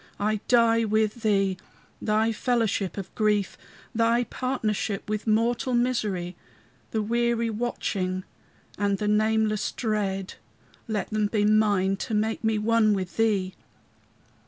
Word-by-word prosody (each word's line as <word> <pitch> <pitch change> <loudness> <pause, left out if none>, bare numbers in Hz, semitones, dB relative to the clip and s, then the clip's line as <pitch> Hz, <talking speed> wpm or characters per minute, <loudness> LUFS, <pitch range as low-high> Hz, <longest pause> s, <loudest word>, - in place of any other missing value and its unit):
I 215 +1 +1
die 230 -1 +4
with 215 +1 0
thee: 195 -4 +2 0.4
thy 220 +1 +2
fellowship 220 -5 0
of 195 - -6
grief, 210 -3 +1 0.4
Thy 230 +1 +2
partnership 220 -6 -2
with 215 +1 -3
mortal 240 +4 +1
misery, 210 -8 -1 0.5
The 220 -1 -1
weary 235 +1 0
watching 195 -5 -2 0.6
and 200 -1 +1
the 210 - -2
nameless 215 0 +1
dread, 200 -4 -2 0.5
Let 215 -1 -3
them 215 -1 +1
be 205 -1 +1
mine 205 -3 +3
to 220 +2 -3
make 220 +2 -1
me 220 -1 +2
one 215 0 +3
with 185 -2 -5
thee. 200 -4 +1
215 Hz, 125 wpm, -26 LUFS, 205-230 Hz, 0.6 s, die